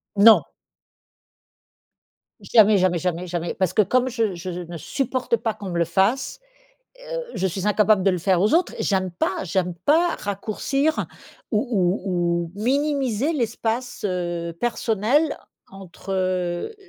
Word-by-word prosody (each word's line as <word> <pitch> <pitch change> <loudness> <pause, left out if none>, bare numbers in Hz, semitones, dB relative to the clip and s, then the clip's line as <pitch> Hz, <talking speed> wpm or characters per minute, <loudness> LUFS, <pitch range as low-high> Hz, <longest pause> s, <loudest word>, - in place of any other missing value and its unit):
Non! 220 +2 +7 2.0
Jamais, 215 -2 +5
jamais, 180 -1 +2
jamais, 180 +1 -2
jamais, 175 -1 -3
parce 185 -2 0
que 215 - +4
comme 255 +5 +1
je 225 -5 -1
je 175 +2 -6
ne 175 -1 -6
supporte 255 - -1
pas 225 0 -2
qu'on 195 -2 -8
me 175 - -3
le 170 - +2
fasse, 195 +10 0 0.6
heu, - - -5
je 190 -3 0
suis 190 +2 -3
incapable 210 -1 +3
de 195 - +4
le 180 - -1
faire 185 +1 +2
aux 210 - +2
autres. 345 +1 +2
J'aime 190 -2 0
pas. 180 +2 -2
J'aime 180 -1 -1
pas 325 - +2
raccourcir 225 +9 -1 0.4
ou 210 -3 +2 0.4
ou 175 -3 -1
ou 205 - -7
minimiser 275 0 0
l'espace, 235 -3 -2
heu, 175 -2 -3
personnel 240 +5 +1 0.3
entre, 195 0 -9
heu, 185 - -1
200 Hz, 140 wpm, -23 LUFS, 180-240 Hz, 2.0 s, Non